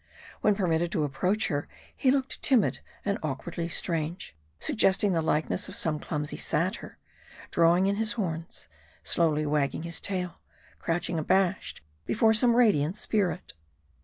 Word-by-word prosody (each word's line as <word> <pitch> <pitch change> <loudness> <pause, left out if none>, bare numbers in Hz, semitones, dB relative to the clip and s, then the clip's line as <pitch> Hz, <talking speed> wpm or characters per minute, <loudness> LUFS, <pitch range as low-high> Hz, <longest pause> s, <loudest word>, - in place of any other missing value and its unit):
When 210 - +3
permitted 175 -3 0
to 155 - +1
approach 185 +9 0
her, 145 -3 -2 0.3
he 265 - +1
looked 270 0 0
timid 250 -7 +3 0.3
and 200 0 0
awkwardly 165 +4 -4
strange; 165 - -2 0.2
suggesting 195 - +3
the 165 - +1
likeness 160 +5 0
of 195 - -7
some 155 -5 +1
clumsy 150 -1 -3
satyr, - - -2 0.5
drawing 170 +2 +4
in 200 +1 +1
his 225 +1 +1
horns; 170 -7 -5 0.4
slowly 155 -3 +2
wagging 150 +1 0
his 170 0 -3
tail; 180 -3 -3 0.4
crouching 170 0 -1
abashed 190 +4 0 0.3
before 220 0 +3
some 235 +2 +4
radiant 200 -8 +3
spirit. 200 -4 -1
175 Hz, 135 wpm, -28 LUFS, 160-205 Hz, 0.5 s, drawing